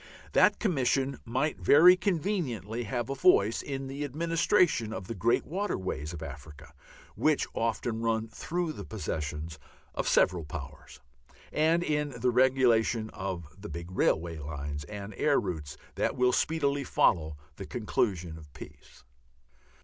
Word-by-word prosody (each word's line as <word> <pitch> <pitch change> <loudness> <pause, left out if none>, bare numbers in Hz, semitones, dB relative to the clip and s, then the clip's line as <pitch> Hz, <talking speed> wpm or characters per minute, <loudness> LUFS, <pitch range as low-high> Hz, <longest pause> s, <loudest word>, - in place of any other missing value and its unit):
That - - +5
Commission 135 - 0
might 130 +6 -1
very 175 +5 +7
conveniently 155 - -2
have 120 +2 -2
a 135 - -2
voice 125 - +4
in 135 -1 -5
the 135 +2 -5
administration 160 - +1
of 95 - -6
the 115 - -5
great 115 +4 +1
waterways 95 - -3
of 85 -2 -7
Africa 75 +1 -10 0.4
(which 155 -2 +2
often 115 0 -1
run 115 -1 0
through 165 +8 -3
the - - -7
possessions 80 -6 -5 0.3
of - - -2
several 90 -3 +3
Powers) 75 - -9 0.5
and 165 +3 +2
in 150 -5 -1
the 125 +2 +2
regulation 120 -3 +3
of 95 -4 -5
the 100 +2 -9
big 85 +1 -7
railway 85 -3 0
lines 75 0 -5
and 105 +2 -7
air 145 -2 +3
routes 80 -7 -5 0.2
that - - -1
will 125 0 +3
speedily 145 -2 +1
follow 80 - +2 0.2
the - - -7
conclusion 85 -4 -1
of 75 -2 -15
peace. - - -13
115 Hz, 140 wpm, -29 LUFS, 85-145 Hz, 0.5 s, very